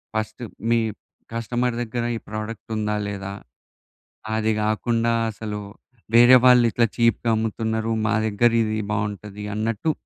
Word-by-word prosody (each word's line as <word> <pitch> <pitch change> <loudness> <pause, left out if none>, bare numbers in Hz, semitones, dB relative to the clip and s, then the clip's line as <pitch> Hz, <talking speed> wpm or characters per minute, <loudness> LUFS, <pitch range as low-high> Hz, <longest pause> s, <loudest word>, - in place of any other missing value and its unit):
First 110 +2 -3 0.3
మీ 115 - +5 0.6
customer 120 +1 -1
దగ్గర 120 0 -3
ఈ - - -7
product 110 +1 -6
ఉందా 105 0 -1
లేదా. 100 -1 -5 1.0
అది 110 0 +1
గాకుండా 115 +2 +1 0.2
అసలు 105 0 -5 0.6
వేరే 120 +2 +9
వాళ్ళు 125 -1 +7
ఇట్లా 120 - +3
చీప్‌గమ్ముతున్నారు. 110 -1 0 0.2
మా 115 - +2
దగ్గర 110 +3 +3
ఇది 110 0 -1
బాగుంటది 105 -1 -4
అన్నట్టు. 115 +8 0
110 Hz, 120 wpm, -23 LUFS, 105-115 Hz, 1.0 s, వేరే